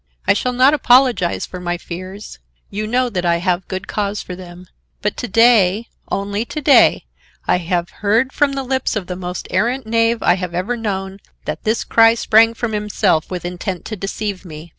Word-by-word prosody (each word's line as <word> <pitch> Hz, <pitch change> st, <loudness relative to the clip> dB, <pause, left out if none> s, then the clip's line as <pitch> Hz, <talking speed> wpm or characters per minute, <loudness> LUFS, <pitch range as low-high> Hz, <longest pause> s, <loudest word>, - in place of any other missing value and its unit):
I 200 Hz, -, +5 dB
shall 250 Hz, +5 st, -1 dB
not 255 Hz, +3 st, +4 dB
apologize 250 Hz, -, +3 dB
for 180 Hz, -, -8 dB
my 175 Hz, 0 st, -2 dB
fears; 185 Hz, +4 st, -9 dB, 0.3 s
you 210 Hz, +2 st, -3 dB
know 250 Hz, +3 st, +1 dB
that 180 Hz, -4 st, -2 dB
I 170 Hz, -1 st, +2 dB
have 180 Hz, +1 st, -1 dB
good 190 Hz, +1 st, -5 dB
cause 205 Hz, 0 st, -2 dB
for 180 Hz, -, -7 dB
them, 180 Hz, 0 st, -11 dB, 0.4 s
but 210 Hz, -, 0 dB
to 245 Hz, -, -4 dB
day, 225 Hz, -1 st, +4 dB, 0.2 s
only 200 Hz, +2 st, -2 dB
to 305 Hz, -, -6 dB
day, 285 Hz, -1 st, +5 dB, 0.4 s
I -, -, +3 dB
have 175 Hz, 0 st, -2 dB
heard 225 Hz, +6 st, +2 dB
from 285 Hz, -1 st, +1 dB
the 275 Hz, 0 st, -3 dB
lips 260 Hz, -2 st, -1 dB
of 205 Hz, -4 st, -2 dB
the 180 Hz, -, -5 dB
most 180 Hz, 0 st, -6 dB
arrant 235 Hz, +7 st, 0 dB
knave 230 Hz, +1 st, +1 dB
I 180 Hz, -, +4 dB
have 180 Hz, -2 st, -5 dB
ever 190 Hz, +8 st, -1 dB
known, 195 Hz, -4 st, -4 dB, 0.3 s
that -, -, -5 dB
this 220 Hz, +2 st, +1 dB
cry 225 Hz, 0 st, +5 dB
sprang 225 Hz, 0 st, +4 dB
from 235 Hz, -1 st, -3 dB
himself 210 Hz, -5 st, 0 dB
with 180 Hz, -2 st, -5 dB
intent 180 Hz, 0 st, -5 dB
to 215 Hz, -, -5 dB
deceive 200 Hz, 0 st, -4 dB
me. 160 Hz, -1 st, -10 dB
205 Hz, 195 wpm, -18 LUFS, 180-230 Hz, 0.4 s, I